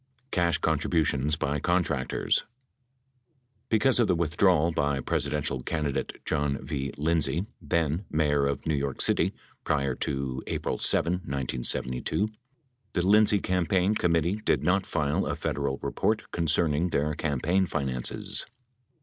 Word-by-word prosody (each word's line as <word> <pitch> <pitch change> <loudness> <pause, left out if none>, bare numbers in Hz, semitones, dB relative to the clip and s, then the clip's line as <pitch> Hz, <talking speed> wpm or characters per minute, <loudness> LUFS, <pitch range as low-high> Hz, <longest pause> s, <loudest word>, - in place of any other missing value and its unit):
CASH 85 -4 +2
CONTRIBUTIONS 75 -2 +1
BY 75 -1 -1
CONTRACTORS 85 -6 0 1.2
Because 125 +3 +3
of 120 - +4
the 90 - +3
withdrawal 85 0 +3
by 70 -3 0
Presidential 70 0 -1
candidate 75 -1 -2
John 75 -3 0
V. 70 -1 -3
Lind 80 +1 +2
say, 75 +8 -1 0.2
then 80 +3 0
mayor 75 -2 +2
of 70 - -3
New 80 - +1
York 70 -2 -2
City, - - +2 0.3
prior 70 -3 0
to 65 0 -3
April - - -2
7, 85 - +2
1972, 65 - -1 0.6
the 90 -1 0
Lind 105 +1 +6
say 105 - +3
campaign 90 +1 +1
committee 85 -1 +1
did - - +1
not 95 +2 +2
file 75 -2 0
a - - -1
Federal 70 0 -2
report - - -1
concerning 80 0 +1
their 75 -1 0
campaign 80 +6 0
finances. 65 -5 -1
75 Hz, 130 wpm, -27 LUFS, 70-90 Hz, 1.2 s, Lind